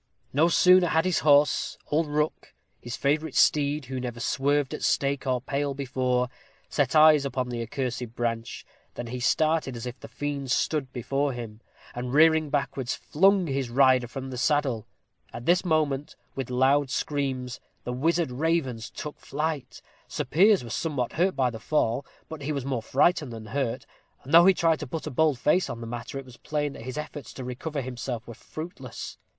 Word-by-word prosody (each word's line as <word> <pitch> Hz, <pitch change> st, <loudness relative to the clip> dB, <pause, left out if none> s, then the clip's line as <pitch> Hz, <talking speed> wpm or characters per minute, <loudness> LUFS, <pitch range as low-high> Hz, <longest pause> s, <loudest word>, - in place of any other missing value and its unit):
No 155 Hz, +5 st, +4 dB
sooner 180 Hz, +1 st, +6 dB
had 160 Hz, +1 st, +2 dB
his 185 Hz, -2 st, +2 dB
horse 145 Hz, 0 st, +3 dB
old 155 Hz, +2 st, +2 dB
Rook, 150 Hz, +1 st, -2 dB, 0.3 s
his 120 Hz, -1 st, -6 dB
favorite 150 Hz, +1 st, 0 dB
steed, 145 Hz, -1 st, +3 dB
who 130 Hz, +1 st, -4 dB
never 120 Hz, -2 st, -5 dB
swerved 140 Hz, +3 st, 0 dB
at -, -, -5 dB
stake 140 Hz, -1 st, 0 dB
or 130 Hz, -1 st, +1 dB
pale 140 Hz, +2 st, -2 dB
before 125 Hz, -2 st, 0 dB, 0.4 s
set -, -, 0 dB
eyes 155 Hz, -2 st, +7 dB
upon 130 Hz, -2 st, -2 dB
the 120 Hz, -1 st, -3 dB
accursed 120 Hz, 0 st, -4 dB
branch, 115 Hz, -1 st, -3 dB, 0.3 s
than 120 Hz, -, -5 dB
he 125 Hz, +2 st, -5 dB
started 155 Hz, +1 st, +1 dB
as 115 Hz, +1 st, -6 dB
if 125 Hz, +1 st, -6 dB
the -, -, -10 dB
fiend 140 Hz, -2 st, -4 dB
stood 135 Hz, +1 st, 0 dB
before 135 Hz, +3 st, -1 dB
him, 115 Hz, -2 st, -8 dB, 0.3 s
and, 125 Hz, +2 st, -4 dB
rearing 160 Hz, 0 st, +5 dB
backwards, 135 Hz, -3 st, -1 dB
flung 195 Hz, +3 st, +3 dB
his 135 Hz, -4 st, -2 dB
rider 130 Hz, 0 st, +4 dB
from 135 Hz, +2 st, -7 dB
the 125 Hz, -, -5 dB
saddle. 130 Hz, -6 st, +1 dB, 0.4 s
At 120 Hz, -, -8 dB
this 175 Hz, +1 st, +3 dB
moment, 150 Hz, -5 st, 0 dB, 0.2 s
with 135 Hz, -3 st, -4 dB
loud 135 Hz, +2 st, +3 dB
screams, 130 Hz, -2 st, -2 dB, 0.2 s
the 125 Hz, -, -4 dB
wizard 165 Hz, +3 st, +1 dB
ravens 135 Hz, -5 st, -1 dB
took 150 Hz, -, -7 dB
flight. 150 Hz, -2 st, -4 dB, 0.2 s
Sir -, -, -3 dB
Piers 190 Hz, -, +4 dB
was 115 Hz, -, -6 dB
somewhat 140 Hz, -7 st, -2 dB
hurt 185 Hz, +3 st, +1 dB
by 130 Hz, -2 st, +1 dB
the 110 Hz, -, -7 dB
fall, 125 Hz, 0 st, 0 dB, 0.2 s
but 160 Hz, -2 st, -8 dB
he 145 Hz, +2 st, -3 dB
was 140 Hz, -3 st, -3 dB
more 130 Hz, -4 st, -1 dB
frightened 150 Hz, +3 st, +2 dB
than 110 Hz, -1 st, -8 dB
hurt; 120 Hz, +1 st, -2 dB, 0.4 s
and 140 Hz, -, -8 dB
though 170 Hz, +2 st, +9 dB
he 190 Hz, -, +6 dB
tried 165 Hz, -2 st, +2 dB
to -, -, -5 dB
put 160 Hz, +5 st, -5 dB
a -, -, -4 dB
bold 150 Hz, +1 st, +2 dB
face 160 Hz, +6 st, +2 dB
on 120 Hz, -2 st, -5 dB
the 115 Hz, -, -6 dB
matter, 120 Hz, +3 st, -6 dB
it 135 Hz, -, -6 dB
was 125 Hz, -2 st, -14 dB
plain 145 Hz, +2 st, -2 dB
that -, -, -10 dB
his 130 Hz, +1 st, -5 dB
efforts 150 Hz, -1 st, -6 dB
to 130 Hz, -, -7 dB
recover 135 Hz, +4 st, -4 dB
himself 125 Hz, -2 st, -5 dB
were 120 Hz, -, -7 dB
fruitless. 140 Hz, -1 st, -8 dB
135 Hz, 190 wpm, -26 LUFS, 125-155 Hz, 0.4 s, though